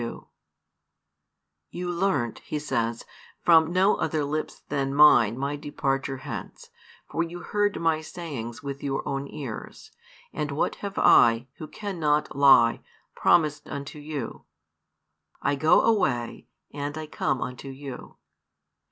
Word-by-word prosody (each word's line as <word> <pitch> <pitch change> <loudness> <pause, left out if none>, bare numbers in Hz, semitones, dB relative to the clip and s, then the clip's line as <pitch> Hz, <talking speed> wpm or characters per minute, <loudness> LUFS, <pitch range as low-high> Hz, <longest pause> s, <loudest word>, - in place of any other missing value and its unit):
You 175 0 -4
learnt, 170 - 0
He 150 - -5
says, 115 -5 -2 0.4
from 165 -1 +5
no 190 +3 +3
other 155 -2 -1
lips 155 +2 -4
than 140 -1 -1
Mine 120 -7 +6
My 140 +2 -2
|343 - - -16
departure 135 -2 -2
hence, 130 - -8 0.4
for - - -2
you 170 +1 -4
heard 205 +1 0
My 165 -1 +1
sayings 145 -8 -7
with 140 0 -5
your 135 -1 -3
own 135 0 -3
ears, 130 -7 -8 0.4
and 150 -2 -3
what 145 - -1
have 200 0 -6
I, 115 +1 +5
Who 155 - -6
cannot 155 -9 -1
lie, 135 -4 +6 0.3
promised 150 -3 +2
unto 140 +2 -6
you? 145 -4 -6 0.9
I - - 0
go 155 +3 +4
away, 135 - 0 0.3
and 145 +1 -4
I 155 - -4
come 135 -3 -1
unto 125 +2 -6
you. 135 -1 -9
145 Hz, 130 wpm, -26 LUFS, 135-160 Hz, 0.9 s, Mine